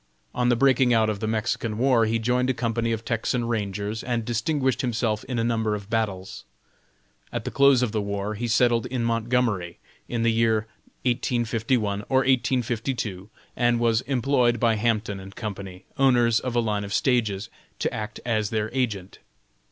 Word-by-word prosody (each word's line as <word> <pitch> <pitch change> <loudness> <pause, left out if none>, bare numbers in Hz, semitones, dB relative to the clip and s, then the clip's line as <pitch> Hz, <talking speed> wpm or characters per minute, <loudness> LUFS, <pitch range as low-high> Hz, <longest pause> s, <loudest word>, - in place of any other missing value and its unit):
On 125 0 +1
the 120 - +4
breaking 130 -1 +4
out 110 -1 +3
of 100 - -5
the 110 - -2
Mexican 110 0 -1
war 125 -2 +3
he 115 +1 +1
joined 125 +3 +1
a 130 - +1
company 115 -1 -1
of 115 0 -3
Texan 115 +1 -1
Rangers, 105 -1 -3
and 120 -2 -2
distinguished 130 +4 0
himself 115 -3 -1
in 125 - -3
a 115 - +1
number 110 -2 0
of 100 0 -9
battles. 100 -5 -2 0.9
At - - -4
the - - -3
close 140 -2 +5
of 120 - 0
the 110 -1 -1
war 100 +1 -3
he 115 +3 -3
settled 120 0 +2
in 125 -2 -2
Montgomery, 115 -6 0 0.3
in 115 -1 -1
the 115 - +3
year 110 -1 +2 0.4
1851, 115 -3 0
or 130 0 +4
1852, 120 -6 -1 0.3
and 120 -1 +2
was 115 -1 +2
employed 125 -2 +2
by 115 -1 +3
Hampton 105 -3 -1
& - - -20
Co., 110 -3 -4 0.4
owners 120 -4 +4
of 125 -2 -4
a - - +4
line 105 -3 0
of 100 0 -3
stages, 115 -5 +1 0.3
to - - -1
act 105 0 -5
as 110 -3 0
their 110 -1 -2
agent. 110 -8 -2
115 Hz, 175 wpm, -25 LUFS, 110-125 Hz, 0.9 s, close